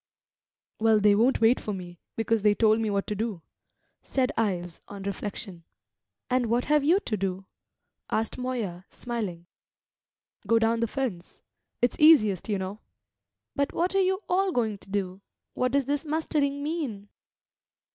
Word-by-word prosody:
"Well, 220 -1 +4
they 210 0 +5
won't 230 +6 +3
wait 230 +3 +5
for 210 - -4
me, 175 -2 -9 0.2
because 225 0 +1
they 205 0 +4
told 220 0 +4
me 220 -1 0
what 200 -1 0
to - - -3
do," 210 -5 -3 0.6
said 265 0 0
Ives 180 -6 -2
on 200 -1 -8
reflection. 200 -2 -5 0.6
"And 250 -1 +1
what 240 +2 +1
have 300 -1 +3
you 340 +7 +4
to 220 - -2
do?" 190 -1 -3 0.6
asked 220 +1 -1
Moya, 220 -9 -3
smiling. 210 -9 -5 1.0
"Go 230 +2 +4
down 225 0 +2
the 230 - +1
fence; 220 -9 -5 0.4
it's 245 - +1
easiest, 220 - +5
you 205 - +1
know." 190 +2 -5 0.8
"But 280 0 0
what 355 +3 0
are 390 - +3
you 380 +1 +1
all 380 +1 +2
going 220 - -1
to - - -16
do? 195 -1 -3 0.3
What 255 0 0
does 280 0 +2
this 285 +1 -1
mustering 290 -2 -1
mean?" 275 -11 -4
225 Hz, 155 wpm, -27 LUFS, 200-270 Hz, 1.0 s, they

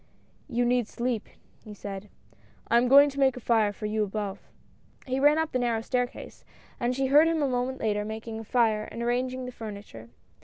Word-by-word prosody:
"You 245 -1 +1
need 245 -2 +2
sleep," 235 -2 -3 0.3
he 210 -1 -10
said, 200 0 -7 0.6
"I 235 - +5
am 245 +1 +3
going 280 +3 +8
to 280 - -7
make 265 -2 +3
a - - -4
fire 225 -3 +2
for 210 +1 -8
you 215 0 0
above." 205 -1 -4 0.7
He 260 0 -1
ran 295 +2 +5
up 320 -1 0
the 255 - 0
narrow 235 -2 0
staircase, 245 +1 -3 0.4
and 245 0 0
she 270 +1 0
heard 295 +4 +6
him 325 -2 +1
a - - +2
moment 255 +1 -2
later 210 -2 0
making 220 +1 -6
a - - -7
fire 220 -2 +1
and 235 - -6
arranging 255 +2 -1
the 250 - -6
furni 210 -4 -8
ture. 115 0 -12
240 Hz, 205 wpm, -27 LUFS, 215-255 Hz, 0.7 s, going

